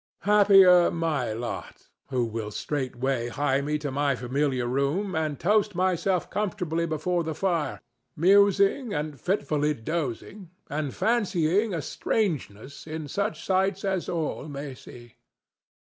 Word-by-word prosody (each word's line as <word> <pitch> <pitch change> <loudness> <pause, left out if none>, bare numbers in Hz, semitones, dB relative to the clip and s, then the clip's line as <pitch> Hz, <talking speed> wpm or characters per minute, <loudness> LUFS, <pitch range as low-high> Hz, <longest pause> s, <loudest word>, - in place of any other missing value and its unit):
Happier 195 -4 +6
my 155 -8 -1
lot, 115 +2 -6 0.2
who 125 -3 0
will 110 -1 -4
straightway 130 0 -2
hie 140 +2 0
me 150 +2 -1
to 145 -2 -4
my 140 0 +1
familiar 130 +1 -1
room 140 +10 -1
and 155 -3 -2
toast 210 +1 +2
myself 185 0 +1
comfortably 180 -5 -1
before 170 +3 -1
the 160 -1 -4
fire, 170 -3 -1 0.4
musing 200 - +4
and 150 -1 -4
fitfully 150 -5 0
dozing 160 - -4 0.2
and 145 -2 -3
fancying 205 -3 +1
a 160 - -3
strangeness 145 - -3
in 155 -1 -5
such 200 +8 -3
sights 190 +1 +1
as 190 -2 -1
all 160 -3 -3
may 140 -1 -6
see. 120 -2 -14
155 Hz, 130 wpm, -26 LUFS, 140-190 Hz, 0.4 s, Happier